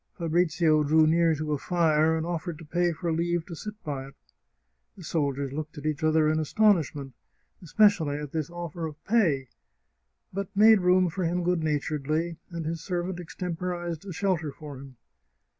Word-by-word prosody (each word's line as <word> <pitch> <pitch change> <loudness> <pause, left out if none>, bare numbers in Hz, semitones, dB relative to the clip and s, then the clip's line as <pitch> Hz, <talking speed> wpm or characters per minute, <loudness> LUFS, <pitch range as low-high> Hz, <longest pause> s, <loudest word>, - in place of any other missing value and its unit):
Fabrizio 165 -2 +2
drew 155 +2 +4
near 165 +1 +3
to 155 0 -3
a 145 - 0
fire, 160 -2 +2
and 160 - -2
offered 170 -1 -4
to 165 - -12
pay 175 +3 +1
for 170 +1 -3
leave 170 +1 0
to 170 - -8
sit 210 +6 -7
by 135 -3 -4
it. 135 - -15 0.8
The 185 - -11
soldiers 140 -4 -1
looked 155 +1 -6
at 145 - -8
each 155 -1 -2
other 155 0 +3
in 155 +1 +2
astonishment, 155 - +1 0.5
especially 175 -5 +3
at 150 -2 -6
this 155 -2 -2
oflfer 170 -1 -5
of 155 0 -16
pay, 170 - +2 0.9
but 195 0 -3
made 215 -1 +7
room 180 0 +4
for 185 +3 -3
him 175 +1 0
good 175 -1 +1
naturedly, 155 +2 -1
and 170 -2 -5
his 165 0 -3
servant 175 0 -3
extemporized 175 -1 -4
a 195 - -7
shelter 175 -4 -1
for 145 -1 -10
him. 135 -1 -12
165 Hz, 175 wpm, -27 LUFS, 155-175 Hz, 0.9 s, made